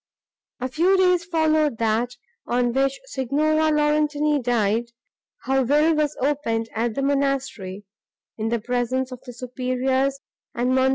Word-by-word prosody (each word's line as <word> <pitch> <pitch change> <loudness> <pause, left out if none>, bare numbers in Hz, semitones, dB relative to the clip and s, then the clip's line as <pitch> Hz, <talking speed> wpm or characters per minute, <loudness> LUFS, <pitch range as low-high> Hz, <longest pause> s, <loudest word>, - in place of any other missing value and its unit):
A 255 - -2
few 345 +9 +2
days 360 -2 +3
followed 315 -5 +1
that, 230 +2 0 0.3
on 245 0 +1
which 270 +1 +1
Signora 310 - +1
Laurentini 300 -1 +2
died, 230 -2 +1 0.6
her 265 0 +2
will 300 +5 +3
was 300 -1 0
opened 240 -5 -1
at 225 0 -1
the 275 - -1
monastery, 275 -9 -1 0.5
in 220 0 -2
the 235 - +1
presence 250 +3 -1
of 250 -1 -8
the 245 - -7
superiors 255 +2 -1 0.4
and 250 +2 +1
Mons. 260 0 +3
265 Hz, 135 wpm, -23 LUFS, 240-300 Hz, 0.6 s, days